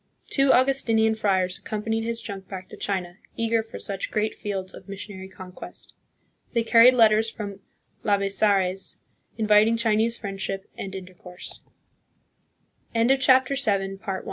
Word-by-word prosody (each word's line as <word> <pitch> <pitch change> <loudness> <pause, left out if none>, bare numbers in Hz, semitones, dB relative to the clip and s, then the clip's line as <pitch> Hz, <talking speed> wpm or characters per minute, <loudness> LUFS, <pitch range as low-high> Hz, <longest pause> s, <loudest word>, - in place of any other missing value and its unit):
Two 275 -1 +4
Augustinian 240 -4 +3
friars 190 -3 0
accompanied 220 +2 -2
his 230 0 -2
junk 195 -3 -7
back 185 -1 -7
to - - -9
China, 180 -3 -3 0.2
eager 230 0 +1
for 220 - -9
such 200 -2 -4
great 215 0 -1
fields 190 -2 -4
of 195 - -13
missionary 195 -1 -7
conquest. 185 -2 -9 0.6
They 235 -2 +2
carried 235 +2 +7
letters 220 -1 +5
from 200 -3 -7 0.4
Labezares 195 -2 +1 0.4
inviting 215 +1 +4
Chinese 225 0 +2
friendship 195 -1 -4
and 195 - -6
interco 180 -1 -10
205 Hz, 115 wpm, -25 LUFS, 190-225 Hz, 0.6 s, carried